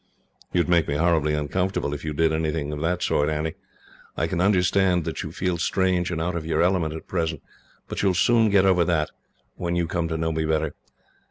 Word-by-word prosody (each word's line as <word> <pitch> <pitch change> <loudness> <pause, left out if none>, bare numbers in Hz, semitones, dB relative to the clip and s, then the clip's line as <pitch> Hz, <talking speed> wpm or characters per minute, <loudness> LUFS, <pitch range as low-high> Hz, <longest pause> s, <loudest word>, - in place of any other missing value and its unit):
"You 90 - +2
would - - -2
make 85 -3 +3
me 70 - -1
horribly 80 -1 +2
uncomfortable, 75 +1 -1
if 75 - -6
you 80 - -3
did 80 +1 +1
anything 80 -2 -1
of 75 - -4
the 85 +2 +1
sort, 75 +1 +1
Annie. 80 +1 -2 0.6
I - - +1
can 85 - -1
understand 90 -2 +2
that - - -3
you - - -6
feel 90 -2 -2
strange 90 0 +1
and 85 -2 -2
out 85 +2 -2
of 85 - -3
your 80 +1 +1
element, 85 -4 +1
at 80 - -8
present, 80 -4 -2 0.4
but - - -4
you 100 - +3
will 90 - 0
soon 115 +4 +4
get 100 -1 +4
over 90 -2 +4
that, 80 -3 0 0.5
when 85 0 -2
you 85 -1 +1
come 85 0 -2
to 80 0 -2
know 80 0 -1
me 80 0 -1
better. 80 -1 0
85 Hz, 225 wpm, -24 LUFS, 80-90 Hz, 0.6 s, soon